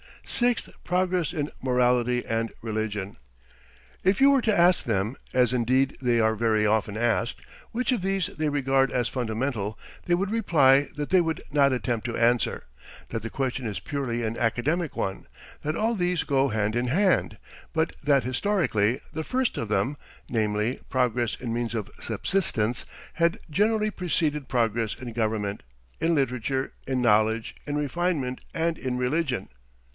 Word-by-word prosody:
6th. 245 -1 0
Progress 180 -2 +1
in 150 -3 -2
morality 125 -1 +2
and 115 0 -1
religion. 105 -3 -3 0.9
If 190 +2 +3
you 275 +1 +7
were 275 -2 +4
to 215 -2 +2
ask 175 +1 +5
them, 110 +2 0 0.2
as 125 -1 +3
indeed 130 +3 +2
they 120 -2 +2
are 110 0 +3
very 110 -1 +2
often 105 0 +1
asked, 120 0 0 0.3
which 250 +3 0
of 245 -6 +1
these 195 -1 0
they 155 -1 -2
regard 135 -2 +2
as 120 -2 +1
fundamental, 110 -3 -2 0.3
they 175 - +3
would 195 +3 -1
reply 145 -11 +4
that 150 -1 -3
they 185 -1 +6
would 165 -2 -2
not 140 -1 +4
attempt 120 -3 -1
to 120 - -3
answer, 120 +1 +2 0.5
that 115 - -3
the 115 - -5
question 130 -2 -2
is 105 - -3
purely 125 -5 -3
an 110 +1 -2
academic 135 +8 0
one, 95 0 -3 0.3
that 155 +2 -2
all 225 +5 +1
these 180 -5 0
go 135 -1 +2
hand 110 -2 0
in 120 +1 0
hand, 185 +8 +2 0.3
but 160 0 0
that 140 -2 +3
historically 130 - +1
the 160 - -3
first 260 -1 0
of 115 - -2
them 105 +8 0 0.3
namely, 110 +1 0
progress 120 -3 +1
in 120 -3 -4
means 120 0 -2
of 105 -3 -4
subsistence 120 - -1 0.3
had 170 0 +2
generally 215 +4 +2
preceded 155 -7 -1
progress 115 -3 0
in 125 -3 -8
government, 110 -3 -1 0.4
in 165 0 +2
literature, 130 -1 -1
in 130 -1 0
knowledge, 110 0 +2
in 145 - -2
refinement, 150 -3 -1
and 165 0 0
in 125 -1 -2
religion. 125 - 0
130 Hz, 160 wpm, -26 LUFS, 115-165 Hz, 0.9 s, you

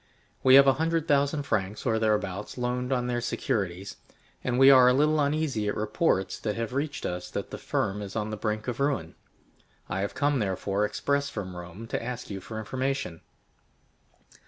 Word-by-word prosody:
We 130 0 +7
have 140 0 +9
a 135 - +6
hundred 165 0 0
thousand 145 +1 +2
francs 105 -5 -2
or 110 -3 +2
thereabouts 105 -2 -1
loaned 125 +1 -2
on 125 -2 +1
their 120 -1 -1
securities, 95 -5 -2 0.5
and 125 -1 0
we 135 +1 +8
are 130 -2 +8
a 125 - +3
little 150 +2 +3
uneasy 145 -7 0
at 105 - -1
reports 105 - 0
that 105 -2 -2
have 115 +1 -3
reached 145 +2 -2
us 90 0 -4
that - - -5
the - - -6
firm 100 +2 -1
is 100 -1 -7
on 110 -1 -2
the - - -2
brink 105 +1 -3
of 125 0 -3
ruin. 135 - 0 0.7
I 95 - -3
have 100 +1 -3
come, 145 -1 +1
therefore, 100 0 0
express 140 +6 -1
from 95 -8 -6
Rome, 90 +5 -8
to - - -3
ask 125 -2 -5
you 100 - -4
for 110 - -7
information." 130 -5 -3
115 Hz, 185 wpm, -27 LUFS, 100-140 Hz, 0.7 s, have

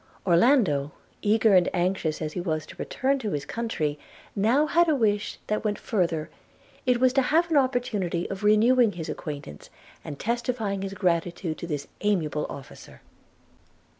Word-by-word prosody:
Orlando, 175 - +3 0.3
eager 215 0 +3
and 180 -2 +5
anxious 175 -3 -1
as 155 - -4
he 180 - -3
was 155 -3 -2
to - - -12
return 270 +1 -1
to 215 -6 -3
his 145 -1 -2
own - - -14
country, 155 -11 -2 0.4
now 230 +9 +3
had 340 +2 +3
a 310 - +3
wish 210 -5 0
that 215 0 -2
went 210 -1 -1
further; 170 -7 -1 0.6
it 250 -1 +3
was 255 0 +4
to 270 - +4
have 330 +6 +2
an 305 - +4
opportunity 240 -10 0
of 195 +1 -6
renewing 220 +2 +4
his 165 -2 -6
acquaintance, 140 - -7 0.3
and 145 -2 -7
testifying 230 - -2
his 195 0 -5
gratitude 170 -2 -1
to 170 - -6
this 145 -4 -4
amiable 165 -8 0
officer. 140 -2 -11
200 Hz, 165 wpm, -26 LUFS, 165-240 Hz, 0.6 s, and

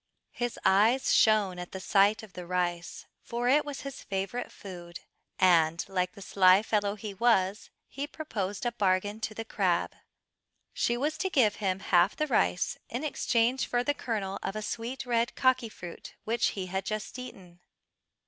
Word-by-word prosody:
His 240 -1 -3
eyes 215 +7 +4
shone 205 -5 +4
at 180 - -8
the 190 - -4
sight 200 +3 +3
of 210 -4 -13
the 180 -1 -8
rice, 175 -1 -2 0.2
for 240 +1 -3
it 290 +4 +4
was 290 -2 -6
his 275 -1 -7
favourite 195 +5 -3
food, 175 -3 -10 0.4
and 170 -3 +3
like 180 -2 -1
the 200 - -10
sly 185 +1 +5
fellow 205 -2 0
he 210 0 -7
was, 195 -2 +1 0.2
he 280 +2 -5
proposed 205 -11 -4
a 240 - +1
bargain 205 -1 0
to 220 -1 -4
the 225 - -5
crab. - - 0 0.8
She 240 - 0
was 295 +5 -1
to 380 - 0
give 240 - +3
him 190 -2 -1
half 175 -2 +3
the 305 - 0
rice 90 - +1
in 245 +5 -4
exchange 250 -4 +1
for 245 0 0
the 290 - +1
kernel 210 -8 -3
of 195 - -4
a 215 - -3
sweet 245 +5 -4
red 235 -1 0
kaki 260 -3 +2
fruit 175 -5 -10
which 230 +1 +1
he 190 - -2
had 190 +1 -3
just 215 +5 -4
eaten. 180 -8 -10
210 Hz, 175 wpm, -29 LUFS, 185-240 Hz, 0.8 s, sly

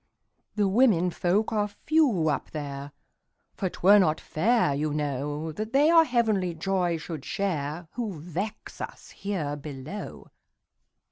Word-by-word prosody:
"The 205 -2 +2
women 190 -5 +4
folk 195 +6 +1
are 210 -1 +1
few 215 - +2
up - - -2
there; 140 -2 -6 0.6
For 190 - -2
't - - -13
were 205 +3 +8
not 160 -4 +2
fair, 210 -2 +2
you 150 +1 -1
know, 145 +2 -2
That 215 - -5
they 290 +4 +5
our 330 -1 +7
heavenly 215 - +1
joy 175 0 0
should 160 -1 -6
shareWho 175 - -3
vex 180 +7 -5
us - - -8
here 170 -8 -3
below. 145 +6 -8
180 Hz, 135 wpm, -27 LUFS, 155-210 Hz, 0.6 s, were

